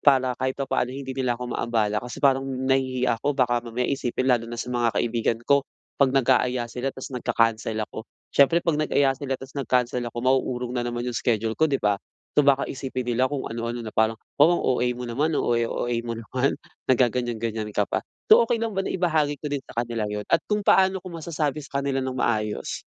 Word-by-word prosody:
para 130 -3 +4
kahit 130 0 -1
papaano 130 -2 -1
hindi 135 -1 -6
nila 130 -2 0
ako 125 0 -6
maabala 105 -3 0
kasi 125 0 -8
parang 135 -1 +3
nahihiya 130 -2 0
ako 145 +2 0
baka 120 -2 +2
mamaya 120 +1 -3
isipin 130 -1 0
lalo 115 -2 +2
na 120 0 -6
sa 125 - -4
mga 120 -2 +1
kaibigan 115 -1 0
ko. 140 +1 +3 0.3
'Pag 135 -1 +4
nag-aaya 125 -2 +3
sila 125 +3 -2
tapos 130 +1 -8
nagca-cancel 115 -2 0
ako. 110 +2 -9 0.3
Siyempre 140 +4 +5
'pag 165 -3 +1
nag-aya 140 -2 +3
sila 135 -1 -3
tas 135 +1 -11
nag-cancel 125 -2 0
ako, 120 - -8
mauurong 130 -1 +1
na 120 - 0
naman 120 0 -3
'yong 120 -2 -3
schedule 110 -1 0
ko, 160 - +5
'di 135 - +1
ba? 105 -1 +3 0.4
So, 150 - +5
baka 140 -1 +3
isipin 130 -2 -4
nila 125 +3 +1
kung 140 -2 -2
ano-ano, 115 +1 -4
na 115 - -6
parang, 110 0 +2 0.2
"Wow, 165 +4 +5
ang - - -4
OA 125 -1 +2
mo 125 0 -6
naman. 145 +7 0
Ang - - +1
OA, 120 -1 +1
OA 120 +1 -2
mo 115 - -3
naman. 125 +4 -1 0.3
Naggaganyan-ganyan 115 -3 0
ka 105 0 0
pa." - - -2 0.2
So, 230 +2 +8
okey 230 0 0
lang 225 -3 -2
ba 195 - 0
na - - -2
ibahagi 155 -6 +1
ko 150 - -4
din 140 -1 -3
sa 120 - -3
kanila 115 -2 -3
'yon? 105 0 -3
At 165 - +2
kung 210 0 0
paano 190 -1 +4
ko 185 - -9
masasabi 155 -3 -3
sa 140 0 -3
kanila 135 -1 -1
nang 130 - -2
maayos? 105 -3 -1
125 Hz, 215 wpm, -25 LUFS, 120-140 Hz, 0.4 s, So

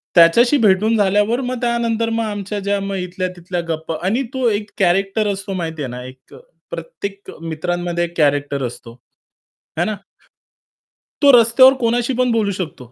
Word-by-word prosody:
त्याच्याशी 235 - +6
भेटून 210 +3 +3
झाल्यावर 210 +5 +2
मग 255 0 -3
त्यानंतर 235 -1 0
मग 230 0 -1
आमच्या 205 -1 -4
ज्या 200 0 -1
मग 195 0 -4
इथल्या-तिथल्या 180 -1 -4
गप्पा 160 0 -3
आणि 235 +8 +1
तो 260 -2 0
एक 210 -1 -2
कॅरेक्टर 195 +3 +2
असतो 195 0 -6
माहितीये 160 -6 -4
ना, 125 0 -7
एक 130 +1 -14
अ, - - -11 0.3
प्रत्येक 200 - -7
मित्रांमध्ये 175 +2 -2
एक 170 0 -5
कॅरेक्टर 145 -2 +1
असतो, 115 -1 -11 0.9
है 175 - +2
ना? 215 - -2 1.3
तो 285 -1 +7
रस्त्यावर 260 +4 +6
कोणाशी 240 +1 0
पण 250 -1 +2
बोलू 220 -3 +1
शकतो. 160 - -6
195 Hz, 155 wpm, -19 LUFS, 170-230 Hz, 1.3 s, तो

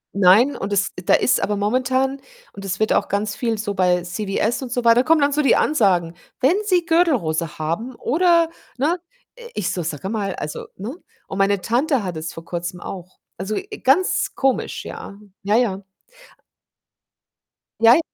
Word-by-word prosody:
Nein, 200 +8 +5
und 200 +1 -5
es 200 0 +1
da - - +4
ist - - +3
aber 205 0 0
momentan 260 +5 0 0.3
und 200 - -9
es 195 +1 -3
wird 215 - +2
auch - - +1
ganz 205 +1 -1
viel 230 -3 -1
so 205 -1 -3
bei 180 -2 +2
CWS 200 +6 -2
und 245 - -7
so 245 -1 -1
weiter 230 +2 +6
kommen 320 0 +3
dann 285 0 +3
so 300 - +2
die 270 - +4
Ansagen: 180 - +2 0.2
„Wenn 275 +8 +4
Sie 360 -4 +2
Gürtelrose 230 - +1
haben 215 +11 -3
oder“ 335 +3 +3 0.3
ne? 325 +7 +1 0.5
Ich 180 - -2
so: 175 - -3
„Sage 160 +4 -4
mal, 200 -4 -2
also“ 150 - -6
ne? 225 - -6 0.3
Und 190 - -6
meine 195 0 +2
Tante 255 +1 +1
hatte 175 -4 -4
es 160 +1 -6
vor 165 0 -10
Kurzem 175 +1 -5
auch. 185 0 -9 0.2
Also, 195 +4 -3
äh, 410 +2 -6
ganz 305 +8 +2
komisch, 270 -1 -1
ja, 200 - -8 0.2
ja, 210 +3 +2
ja. 200 -6 0 2.0
Jei 230 +6 +7
215 Hz, 170 wpm, -21 LUFS, 190-270 Hz, 2.0 s, Jei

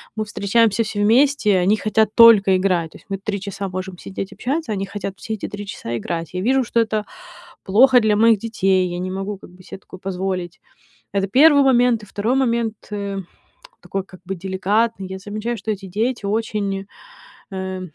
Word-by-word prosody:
мы 215 - -2
встречаемся 210 +2 +2
все 210 -1 -3
вместе, 230 -2 +3
они 185 +4 +3
хотят 215 0 +1
только 215 -5 +7
играть, 180 -4 0
то - - -13
есть - - -22
мы 195 - -2
три 200 +1 -4
часа 200 0 -5
можем 185 0 -6
сидеть 195 +2 -6
общаться, 280 -1 -3
они 195 -1 -2
хотят 195 -1 -6
все 220 - -5
эти 215 - -5
три 205 0 -7
часа 120 -11 -5
играть. 165 - -5
Я 185 - -3
вижу, 260 +5 +2
что 230 0 0
это 215 -2 0 0.6
плохо 250 +6 +5
для 215 -2 +2
моих 225 -1 +4
детей, 195 -5 +1
я 175 0 -4
не 185 +1 -3
могу 195 +1 -4
как - - -14
бы 185 +1 -17
се - - -9
такое 185 -1 -14
позволить- 185 -2 -4 0.5
это 195 0 0
первый 285 +6 +6
момент. 245 -3 +3
И - - -9
второй 220 +6 -1
момент, 235 -4 +1 0.2
э, 200 -1 -4 0.6
такой 195 -1 -4
как 185 -1 -16
бы 195 +1 -4
деликатный: 195 +3 -1
я 190 0 -6
замечаю, 215 +4 -4
что 215 +2 -3
эти 195 -2 -5
дети 225 +4 -2
очень, 200 -2 -2 0.7
э, 190 0 -4
200 Hz, 190 wpm, -20 LUFS, 190-225 Hz, 0.7 s, только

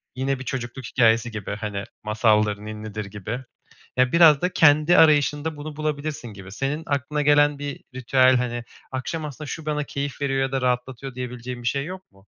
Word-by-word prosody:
Yine, 135 +1 -1
bir - - -6
çocukluk 125 -1 -5
hikâyesi 115 -1 +3
gibi, 105 -2 -5
hani, 105 -2 -4 0.2
masaldır, 105 -1 +2
ninnidir 105 0 -6
gibi. 105 +4 -5 0.6
Ya, 125 0 +3
biraz 160 -4 +7
da 180 - +1
kendi 155 +2 +5
arayışında 150 -1 +4
bunu 145 0 -7
bulabilirsin 150 -3 -3
gibi. 95 -3 -11
Senin 135 +7 -2
aklına 145 +1 -1
gelen 145 0 +4
bir 145 -1 -5
ritüel, 130 0 +4
hani, 120 -1 -2 0.3
akşam 150 +5 -3
aslında 150 +1 -7
şu 160 -2 -6
bana 150 -1 -1
keyif 140 0 -5
veriyor 135 -1 0
ya 135 0 -2
da 135 - 0
rahatlatıyor 125 +1 -2
diyebileceğim 125 -1 -6
bir 120 - +1
şey 140 +3 -1
yok 185 - -9
mu? 95 +1 -23
130 Hz, 180 wpm, -24 LUFS, 115-145 Hz, 0.6 s, biraz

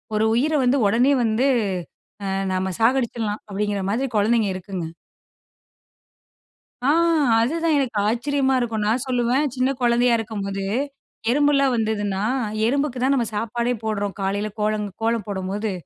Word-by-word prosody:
ஒரு 215 +1 +2
உயிர 300 +6 +1
வந்து 255 +3 +3
ஓடனே 245 +7 +3
வந்து, 225 +4 +2 0.8
அ - - -3 0.3
நம்ம 185 0 -1
சாகடிச்சிடலாம் 230 -3 0
அப்டிங்கிற 205 0 -2
மாரி 255 +6 0
கொழந்தைங்க 215 0 +2
இருக்குங்க. 185 -2 -5 2.0
ஆ 275 - +2 0.5
அதுதான் 325 +5 +1
எனக்கு 235 -6 -2
ஆச்சரியமா 265 +3 +1
இருக்கும். 225 -3 -1
நான் 235 +3 +1
சொல்லுவேன் 250 +3 +1
"சின்ன 255 +1 +1
கொழந்தையா 240 0 +3
இருக்கும்போது, 200 -3 -4 0.7
எறும்புலாம் 275 -1 +3
வந்ததுனா 205 -3 -1 0.4
எறும்புக்கு 275 +1 0
தான் 275 +1 +3
நம்ம 240 -3 +1
சாப்பாடே 235 +3 -1
போடுறோம். 205 -3 -2
காலையில 200 +2 -1
கோல, 210 +1 +1 0.3
கோலம் 225 -2 0
போடும்போது. 200 +2 -3
230 Hz, 125 wpm, -22 LUFS, 205-255 Hz, 2.0 s, வந்து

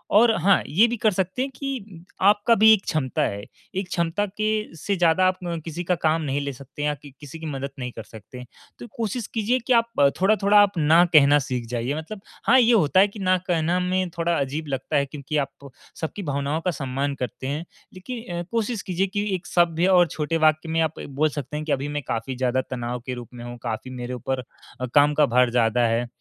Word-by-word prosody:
और 230 +2 +6
हाँ, 195 +1 +4
ये 195 +10 +4
भी 240 +1 -3
कर 215 0 +2
सकते 190 +5 -2
हैं 270 +1 -2
कि 215 - -6 0.2
आपका 205 +4 +4
भी 220 +1 +7
एक 205 -3 +1
क्षमता 135 -5 -1
है, 100 0 -2 0.3
एक 190 0 -2
क्षमता 170 +4 0
के 215 -1 -2
से 200 +6 -1
ज़्यादा 175 +1 +3
आप 185 0 0 0.3
किसी 170 +1 -5
का 180 +1 +1
काम 160 +1 +2
नहीं 145 -1 -1
ले 140 0 -4
सकते 135 +3 -11
हैं 150 - +2
या - - 0 0.3
किसी 150 +2 -10
की 160 - -8
मदद 140 -2 -4
नहीं 125 -1 -4
कर 115 - -8
सकते। 115 +4 -11 0.4
तो - - -8
कोशिश 225 0 -3
कीजिए 230 +3 +1
कि 255 - +4
आप 230 -1 +4 0.3
थोड़ा-थोड़ा 205 +1 +4
आप 205 -2 +3
ना 160 +2 +5
कहना 145 -1 +7
सीख 125 -3 -3
जाइए। 120 +3 -2
मतलब 195 +6 -7 0.3
हाँ 255 +3 +7
ये 240 -1 +5
होता 185 -6 +4
है 200 - +6
कि, 205 +1 -11
ना 185 -1 +2
कहना 170 0 +1
में 185 0 0
थोड़ा 170 0 +1
अजीब 145 +3 -3
लगता 135 +2 -3
है 140 - +2
क्योंकि 145 +2 -5
आप, 140 0 -4 0.3
सबकी 160 +6 -4
भावनाओं 145 +1 -2
का 180 - +2
सम्मान 140 -1 -3
करते 130 0 -5
हैं, 150 +4 -3 0.3
लेकिन 185 -3 -6
कोशिश 230 -1 -1
कीजिए 185 +1 -1
कि 205 +2 -2
एक 180 - -7
सभ्य 170 0 +2
और 180 -2 +5
छोटे 160 +1 -2
वाक्य 155 +1 +2
में 165 0 0
आप 160 -1 -1
बोल 145 +3 +1
सकते 145 0 -5
हैं 155 - -5
कि, 155 - -3
अभी 135 +1 0
मैं 145 0 -3
काफ़ी 115 +3 -3
ज़्यादा 130 0 0
तनाव 120 -1 -3
के 130 - -3
रूप 120 -2 -8
में 120 -1 -9
हूँ, 120 0 -7
काफ़ी 120 +2 -4
मेरे 125 0 -6
ऊपर 130 +1 -3 0.5
काम 145 0 +5
का 150 0 +4
भार 125 -1 +3
ज़्यादा 120 0 +2
है। 115 +2 0
160 Hz, 220 wpm, -24 LUFS, 135-195 Hz, 0.5 s, भी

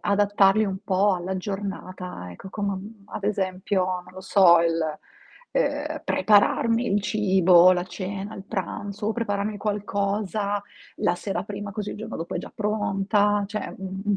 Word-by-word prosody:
adattarli 205 +1 +3
un 190 -2 -3
po' 195 +1 +3
alla 180 +1 -3
giornata, 185 - -5
ecco, 140 - -10
come 200 0 -2
am 195 +3 -6
ad 205 - -7
esempio, 190 -1 0
non 180 -1 -4
lo 185 - -9
so, 185 -2 +6
il, 165 0 +1 0.7
ehm, - - -1
prepararmi 230 -1 +3
il 205 -1 +2
cibo, 190 -4 +5
la 175 -1 0
cena, 195 +2 -5
il 190 - -9
pranzo, 205 +2 -3
prepararmi 210 -2 -2
qualcosa 205 0 -1 0.3
la 175 - +1
sera 180 -1 -3
prima, 205 0 -6
così 210 0 -4
il - - -8
giorno 220 +2 -6
dopo 165 - -5
è - - -1
già - - -8
pronta, 205 -1 +1
cioè 210 +1 -5
u - - -10
u 190 0 -5
un 200 - +3
200 Hz, 160 wpm, -25 LUFS, 185-210 Hz, 0.7 s, so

